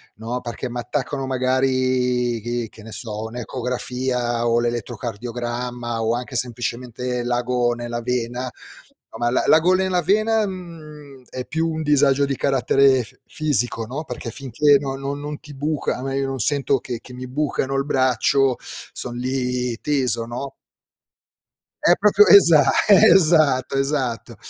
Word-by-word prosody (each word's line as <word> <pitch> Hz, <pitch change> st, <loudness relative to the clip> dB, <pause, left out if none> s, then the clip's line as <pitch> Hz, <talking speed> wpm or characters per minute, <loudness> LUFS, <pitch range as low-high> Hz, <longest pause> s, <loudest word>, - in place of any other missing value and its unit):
no, 115 Hz, +3 st, -4 dB
perché 120 Hz, +1 st, -5 dB
m'attaccano 135 Hz, +3 st, -3 dB
magari 130 Hz, -2 st, +1 dB
che 120 Hz, +1 st, -3 dB
che 110 Hz, -, -15 dB
ne 110 Hz, -, -10 dB
so, 110 Hz, -2 st, -6 dB
un'ecografia 125 Hz, 0 st, -2 dB
o 115 Hz, 0 st, +3 dB
l'elettrocardiogramma 120 Hz, 0 st, -4 dB
o 110 Hz, +1 st, +1 dB
anche 125 Hz, +2 st, -6 dB
semplicemente 125 Hz, 0 st, -3 dB
l'ago 120 Hz, 0 st, 0 dB
nella 120 Hz, 0 st, -5 dB
vena. 125 Hz, +1 st, -2 dB, 0.6 s
A -, -, -9 dB
me 120 Hz, 0 st, +1 dB
l'a 125 Hz, -, +1 dB
l'ago 165 Hz, +4 st, +5 dB
nella 185 Hz, -1 st, +1 dB
vena, 215 Hz, +4 st, +2 dB
mhmm, 155 Hz, -7 st, -10 dB
è 130 Hz, -, -5 dB
più 160 Hz, +1 st, -1 dB
un 160 Hz, 0 st, -3 dB
disagio 145 Hz, -1 st, +3 dB
di 140 Hz, -1 st, -2 dB
carattere 135 Hz, 0 st, +3 dB
f 110 Hz, -, -15 dB, 0.2 s
fisico, 125 Hz, -7 st, -1 dB
no, 135 Hz, +7 st, -5 dB
perché 125 Hz, -3 st, -6 dB
finché 140 Hz, +3 st, +2 dB
no 135 Hz, -1 st, -4 dB
non 140 Hz, +1 st, -4 dB
non 150 Hz, 0 st, -6 dB
ti 150 Hz, -, -12 dB
buca, 145 Hz, +1 st, -2 dB
a 125 Hz, -, -7 dB
me 135 Hz, 0 st, -2 dB
io 135 Hz, 0 st, -1 dB
non 135 Hz, -1 st, -4 dB
sento 140 Hz, +2 st, +1 dB
che 120 Hz, -1 st, -6 dB
che 125 Hz, -, -13 dB
mi 125 Hz, +1 st, -7 dB
bucano 135 Hz, 0 st, -2 dB
il 135 Hz, 0 st, 0 dB
braccio, 130 Hz, -1 st, +2 dB, 0.4 s
son 120 Hz, -1 st, -6 dB
lì 125 Hz, -1 st, -2 dB
teso, 125 Hz, -6 st, 0 dB
no? 125 Hz, +4 st, -6 dB, 1.3 s
È 175 Hz, -, +5 dB
proprio, 205 Hz, 0 st, +5 dB
esa 165 Hz, -8 st, +7 dB, 0.2 s
esatto, 155 Hz, -9 st, +5 dB
esatto. 135 Hz, -5 st, -2 dB
130 Hz, 145 wpm, -21 LUFS, 120-145 Hz, 1.3 s, esa